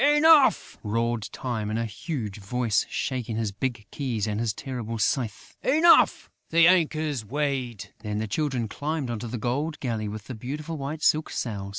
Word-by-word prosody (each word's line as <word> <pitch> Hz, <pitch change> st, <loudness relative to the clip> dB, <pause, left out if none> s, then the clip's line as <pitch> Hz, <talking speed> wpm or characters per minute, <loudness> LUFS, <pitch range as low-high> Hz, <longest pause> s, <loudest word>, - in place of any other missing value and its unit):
Enough!" 295 Hz, -, +5 dB
roared 115 Hz, 0 st, -1 dB
Time, 115 Hz, -5 st, -3 dB
in 110 Hz, -, -1 dB
a 115 Hz, -, 0 dB
huge 110 Hz, -, -5 dB
voice, 115 Hz, +2 st, 0 dB
shaking 125 Hz, -4 st, -2 dB
his 110 Hz, -2 st, -1 dB
big 110 Hz, +1 st, -3 dB
keys 120 Hz, -7 st, -2 dB
and 105 Hz, -1 st, -2 dB
his 115 Hz, -2 st, +1 dB
terrible 115 Hz, -1 st, -5 dB
scythe, 110 Hz, -2 st, -1 dB
"Enough! 315 Hz, +6 st, +5 dB, 0.2 s
The 165 Hz, 0 st, +6 dB
anchor's 155 Hz, -7 st, +2 dB
weighed...." 130 Hz, -3 st, -2 dB
Then 105 Hz, -1 st, -4 dB
the 110 Hz, +1 st, -2 dB
Children 130 Hz, 0 st, -1 dB
climbed 145 Hz, +2 st, -3 dB
into 120 Hz, +1 st, -4 dB
the 120 Hz, +2 st, -4 dB
gold 140 Hz, +8 st, -2 dB
galley, 115 Hz, -5 st, -2 dB
with 105 Hz, 0 st, -6 dB
the 130 Hz, -, -6 dB
beautiful 150 Hz, +8 st, -5 dB
white 150 Hz, +2 st, -5 dB
silk 155 Hz, +1 st, +3 dB
sails. 100 Hz, -5 st, -3 dB
120 Hz, 170 wpm, -26 LUFS, 110-150 Hz, 0.2 s, The